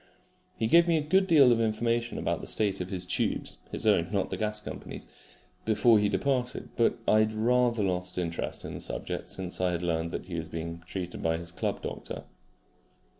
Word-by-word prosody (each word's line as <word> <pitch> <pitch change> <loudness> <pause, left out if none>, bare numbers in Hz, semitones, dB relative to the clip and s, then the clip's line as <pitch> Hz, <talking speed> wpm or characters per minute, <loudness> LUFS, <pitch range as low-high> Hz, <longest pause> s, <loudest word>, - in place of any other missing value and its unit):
He 110 - 0
gave 170 +9 +6
me 165 -1 +3
a - - +1
good 190 +3 +4
deal 145 -8 +7
of 115 -1 +3
information 115 +2 0
about - - -1
the - - -8
state 100 -3 +1
of 90 - -4
his 90 -2 +1
tubes 90 - -1
(his - - -2
own, 95 -5 +3
not 100 -2 -1
the - - -1
gas 105 -1 0
company's) 105 - -8 0.6
before 110 +1 +4
he 105 0 +2
departed; 125 +5 -1
but 115 - +2
I 110 - +5
had 110 0 +2
rather 120 0 +2
lost 90 -1 -2
interest 85 -2 -3
in - - -6
the - - -6
subject - - -4
since 90 -1 -3
I 90 -1 +2
had 85 0 -3
learned 85 -1 0
that - - -5
he 90 - -9
was 80 -1 -4
being 85 +1 -5
treated 90 -2 -5
by 80 0 +1
his 85 0 -6
club - - -3
doctor. - - -5
105 Hz, 205 wpm, -29 LUFS, 90-120 Hz, 0.6 s, deal